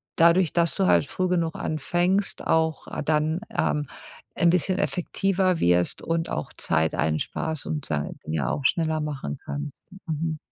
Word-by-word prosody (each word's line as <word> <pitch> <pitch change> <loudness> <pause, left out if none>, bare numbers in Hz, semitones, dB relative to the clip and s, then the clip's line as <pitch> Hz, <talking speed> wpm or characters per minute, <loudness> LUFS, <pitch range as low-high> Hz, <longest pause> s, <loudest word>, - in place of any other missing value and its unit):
dadurch, 170 0 +4
dass 170 -1 +2
du 195 - +2
halt - - +4
früh 185 - -1
genug 170 -3 0
anfängst, 175 +6 0
auch 160 -1 +1 0.2
dann, 155 +2 +1 0.2
ähm, 150 -1 +1 0.5
'n 170 - +4
bisschen 180 +2 +2
effektiver 185 0 0
wirst 90 0 +2
und 165 0 -1
auch 75 - -3
Zeit 80 -1 +2
einsparst 80 - -1
und 150 -3 -3
dann 75 -1 -2
ja 75 -5 -1
auch 140 - -3
schneller 160 +1 +2
machen 140 - -4
kannst. 145 -1 -5 0.3
Mhm. 160 0 -2
160 Hz, 150 wpm, -25 LUFS, 140-175 Hz, 0.5 s, dadurch